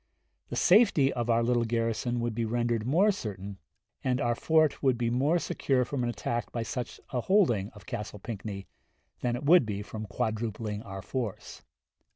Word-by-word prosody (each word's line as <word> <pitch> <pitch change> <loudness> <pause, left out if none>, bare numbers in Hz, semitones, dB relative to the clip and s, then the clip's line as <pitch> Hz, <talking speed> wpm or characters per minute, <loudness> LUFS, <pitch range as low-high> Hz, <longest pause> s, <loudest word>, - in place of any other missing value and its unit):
The - - -4
safety 180 - +5
of 120 -1 -2
our 115 0 +3
little 120 0 +2
garrison 115 +1 -1
would 120 -1 -1
be 115 +1 -1
rendered 120 0 0
more 185 +10 +4
certain, 100 - -6 0.4
and 130 -1 +1
our 120 -3 +1
fort 155 +4 +2
would 130 -3 +3
be 115 -1 0
more 140 +8 +2
secure 135 -6 0
from 135 +1 -3
an 120 - 0
attack 120 0 -3
by 115 - -2
such 125 +2 -5
a 125 - 0
holding 120 - +3
of 100 -3 -14
Castle 105 -1 -5
Pinckney, 100 -2 -6 0.5
than 120 -1 0
it 125 - -5
would 175 +1 +7
be 105 -2 -4
from 110 +1 -7
quadrupling 110 -1 -3
our 95 -2 -8
force. 120 -7 -5
120 Hz, 180 wpm, -29 LUFS, 110-130 Hz, 0.5 s, would